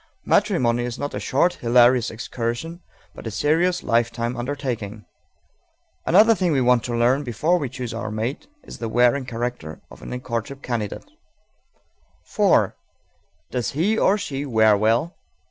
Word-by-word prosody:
Matrimony 120 -1 +2
is 120 -1 -4
not 145 - -4
a - - -3
short, 170 +7 +1
hilarious 120 0 +4
excursion, 120 +9 -5 0.3
but - - -9
a - - -2
serious 160 - +1
lifetime 120 +1 0
undertaking. 120 -5 -4 1.0
Another 215 +6 +6
thing 185 -5 0
we 140 - +2
want 125 -2 +3
to 120 - -3
learn 125 +4 +2
before 150 +9 0
we 140 -5 -3
choose 125 -2 -6
our 115 -1 -4
mate 110 +7 -4 0.2
is - - -11
the 115 - -3
wearing 125 +4 +2
character 120 -10 -5
of - - -14
any 125 - -5
courtship 125 +2 -5
candidate. 115 -5 -4 1.3
_4. - - +3 0.8
Does 125 -4 -2
he, 180 +10 +1
or 205 -2 +3
she, 140 -8 -4
wear 110 -5 +4
well? 115 - +1
125 Hz, 145 wpm, -22 LUFS, 115-145 Hz, 1.3 s, Another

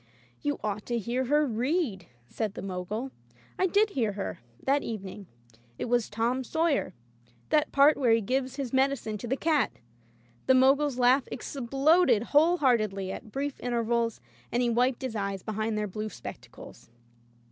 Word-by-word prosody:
"You 290 0 -1
ought 210 0 -3
to 240 - 0
hear 240 +4 -1
her 295 +4 +3
read,'* 245 - -1 0.2
said 215 - -3
the - - -6
Mogul. 195 +7 -4 0.5
I 375 - +3
did 410 +3 +3
hear 225 - 0
her, 195 0 -5 0.2
that 280 +1 +2
evening. 200 -4 -6 0.5
It - - -3
was 240 -1 +1
"Tom 235 +5 0
Sawyer," 315 - 0 0.5
that 305 -1 +2
part 285 +2 +5
where 250 -4 +2
he 225 - +5
gives 260 +4 -1
his 270 -3 -4
medi 270 +1 +3
cine 215 -5 -6
to 240 - -6
the 265 +3 0
cat. 300 -7 +1 0.7
The 260 - +6
Mogul's 270 +1 +4
laugh 255 +2 +4
exploded 270 0 +2
whole 325 +5 +5
heartedly, 215 - +1
at 215 +2 -8
brief 280 +2 -3
intervals, 235 -1 -1 0.3
and 245 +1 +1
he 240 - +1
wiped 250 +2 +1
his 255 -3 -3
eyes 195 -2 -3
behind 215 0 -2
their 210 - 0
blue 215 +3 -4
spectacles. - - -11
245 Hz, 165 wpm, -28 LUFS, 215-275 Hz, 0.7 s, The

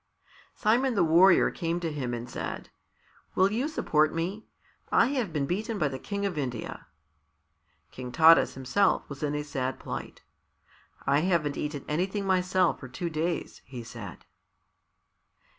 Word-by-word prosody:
Simon 240 +4 +2
the 200 - +4
Warrior 170 +3 +5
came 170 0 -2
to 165 -2 -3
him 135 -5 -3
and 120 +1 -6
said, 120 - -6 0.6
"Will 190 +2 +4
you 245 +7 0
support 155 - +2
me? 180 +6 -4 0.4
I 235 - +4
have 250 -10 -1
been 150 -3 -1
beaten 215 - -2
by 155 -6 +1
the 130 -1 -6
King 200 +5 -3
of 180 -6 -2
India." 125 -5 -5 1.0
King 125 -1 -7
Taras 165 +3 +6
himself 135 +10 +1
was 140 -1 -9
in 150 -1 -1
a 150 - -2
sad 130 -3 -3
plight. - - -7 0.8
"I 140 +1 +3
haven't 160 -4 +1
eaten 150 -2 -4
anything 190 +6 -1
myself 185 -1 +2
for 130 - -8
two 170 +7 -4
days," 160 +1 -3
he 125 -2 -8
said. 115 -6 -9
165 Hz, 150 wpm, -28 LUFS, 140-190 Hz, 1.0 s, Taras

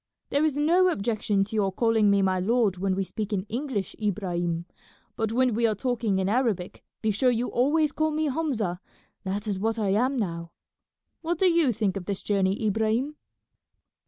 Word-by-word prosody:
"There 285 +2 +2
is 310 -3 +1
no 345 +5 +4
objection 210 - 0
to 210 +3 -6
your 200 -3 +1
calling 225 0 +2
me 200 -1 +3
my 185 -1 +1
lord 205 -1 +1
when 190 0 0
we 195 - 0
speak 210 +2 -5
in 195 -3 0
English, 220 -2 -4
Ibrahim, 175 -4 -1 0.5
but 220 -1 -1
when 250 +1 +2
we 230 +2 +2
are 215 - 0
talking 230 -3 -1
in 190 0 0
Arabic 215 -5 -1 0.2
be 220 - +2
sure 250 +5 +2
you 245 0 0
always 295 +5 +2
call 315 +1 0
me 310 0 -1
Hamza; 255 - -1 0.5
that 200 +2 -3
is 200 -3 -2
what 225 +3 0
I 210 -3 0
am 250 +7 +1
now. 170 -6 -3 0.7
What 340 +1 -1
do 380 - +2
you 335 -7 +4
think 205 -3 -1
of 185 - -6
this 200 0 -3
journey, 195 +1 0
Ibrahim?" 220 +7 0
215 Hz, 190 wpm, -26 LUFS, 195-255 Hz, 0.7 s, no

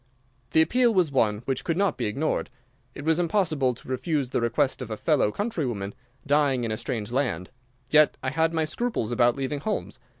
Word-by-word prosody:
The 160 - +7
appeal 245 +6 +3
was 175 -6 +3
one 110 -4 +1
which 135 -1 -2
could 165 -1 -1
not 195 -4 +2
be - - -2
ignored. 140 +9 -1 0.5
It 145 - -7
was 160 +1 +3
impossible 160 - +1
to - - -15
refuse 135 0 -1
the - - 0
request 130 +4 +1
of 125 - -5
a 110 - -4
fellow 145 -8 +2
countrywoman 125 - -3 0.3
dying 140 -3 +2
in 115 - -2
a 110 - -2
strange 115 -2 -4
land. 125 -8 -1 0.4
Yet 155 -1 +5
I 130 - -1
had 160 +2 +2
my 160 -1 0
scruples 155 - -2
about 120 0 +3
leaving 140 +1 -3
Holmes. 210 +9 -3
140 Hz, 195 wpm, -26 LUFS, 120-160 Hz, 0.5 s, The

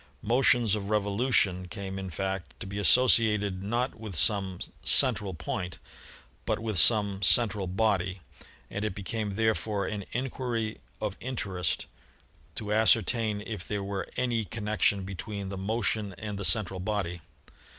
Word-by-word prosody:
Motions 120 -2 +3
of 100 -2 -2
revolution 100 -3 +2
came 95 0 -6
in 95 -1 -5
fact 95 +2 -4
to 115 - -6
be 100 +1 -5
associated 105 -1 +4
not 120 +6 -1
with 110 -4 -8
some 95 0 +1 0.2
'central 100 -4 +4
point' 90 +2 -4 0.7
but - - 0
with 110 -5 -1
some 100 -2 +6
'central 100 -1 +3
body/ 95 -1 0 0.5
and 100 - -3
it 105 -3 -2
became 105 0 -4
therefore 110 -2 0
an 105 0 -4
inquiry 120 -3 -3 0.2
of 105 -3 -3
interest 95 - -2 0.7
to 105 -1 -2
ascertain 110 -1 +3
if 105 -5 -6
there 105 -1 -2
were 100 0 -4
any 120 -3 0
connection 105 -2 0
between 100 +1 -6
the 100 - -5
motion 105 0 -1
and 105 -2 -5
the 100 - -2
central 95 -4 +1
body. 90 -4 -3
105 Hz, 140 wpm, -28 LUFS, 95-110 Hz, 0.7 s, some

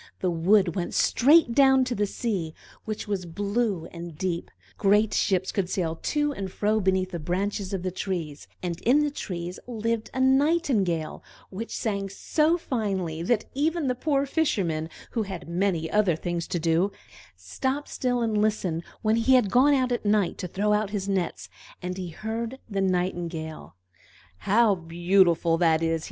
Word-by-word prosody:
The 185 - 0
wood 175 +2 +3
went 180 -3 -3
straight 285 -1 +4
down 265 0 +5
to 250 - -2
the 205 -2 0
sea, 195 -8 -3 0.3
which 215 0 -4
was 195 -4 -2
blue 200 0 -1
and 170 -2 -8
deep; 175 -1 -2 0.3
great 210 +2 +3
ships 190 -2 +1
could 190 -3 -1
sail 170 -4 -1
to 295 -1 0
and 195 -6 -5
fro 215 +3 +1
beneath 190 -1 +1
the 170 - -4
branches 190 +4 -2
of 190 -3 -3
the 185 - -2
trees; 170 -6 -4 0.2
and 170 -2 -3
in 265 +6 +4
the 295 - 0
trees 180 -8 -5
lived 230 -1 -2
a 260 - -4
Nightingale, 260 - +2 0.3
which 220 +5 -5
sang 200 -3 -2
so 310 - +1
finely 195 - -2
that 215 +5 +1
even 315 +3 0
the 255 - +1
poor 280 +2 0
Fisherman, 185 - 0 0.2
who 230 - -1
had 190 -5 -6
many 170 -1 0
other 205 -5 +3
things 175 +1 -3
to - - -2
do, 170 +4 +1 0.4
stopped 260 - -3
still 245 -2 -1
and 215 -2 +1
listened, 195 -6 0 0.2
when 220 +1 +3
he 260 +3 +4
had 225 -7 +3
gone 280 +4 +5
out 255 -2 +1
at 240 - -1
night 205 -3 +1
to 180 - -3
throw 205 +4 0
out 210 -1 +1
his 200 -2 -3
nets, 175 - -2 0.3
and 180 0 -4 0.2
heard 225 +6 -4
the 200 -3 -2
Nightingale. 175 - -2 0.6
"How 210 - +3
beautiful 170 -1 +2
that 165 -2 +3
is!" 165 0 +1
195 Hz, 170 wpm, -26 LUFS, 175-230 Hz, 0.6 s, down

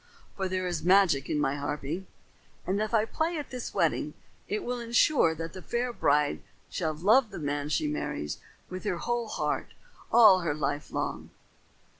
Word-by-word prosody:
For 190 -1 -1
there 185 0 -1
is 175 -3 -2
magic 180 -6 +4
in 150 - 0
my 140 -1 0
harping, 145 +5 -4 0.6
and 195 +3 0
if 215 - -1
I 220 -2 +3
play 320 +8 -1
at 295 - -6
this 250 -2 -5
wedding, 160 -4 0 0.3
it 210 - -2
will 245 0 -3
insure 235 - +3
that 165 +1 -6
the 185 - -8
fair 240 +5 -2
bride 145 -6 +2 0.3
shall 160 -3 -1
love 215 - +4
the 200 - -8
man 145 -2 -2
she 150 0 +1
marries 145 - -3 0.3
with 185 0 -7
her 200 -5 -1
whole 240 +4 -2
heart - - -2 0.4
all 215 -5 +8
her 165 -5 -1
life 145 0 -2
long." - - -3
185 Hz, 175 wpm, -28 LUFS, 150-220 Hz, 0.6 s, all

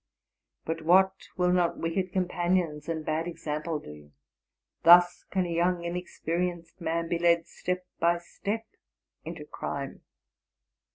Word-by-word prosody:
But 165 0 -3
what 190 +4 +5 0.2
will 180 0 +3
not 175 -2 +2
wicked 180 +3 -1
companions 175 -4 0
and 160 -2 -3
bad 160 +2 -1
example 155 -1 -3
do! 75 - -12 0.7
Thus 175 +1 +7
can 190 -2 0
a 170 - -3
young, 175 +1 +1
inexperienced 175 0 -3
man 165 0 -1
be 170 0 -1
led 170 -1 +3
step 180 +1 -3
by 170 +1 +3
step 205 +5 -4 0.6
into 160 -2 -7
crime! 140 -2 -5
170 Hz, 125 wpm, -28 LUFS, 165-180 Hz, 0.7 s, Thus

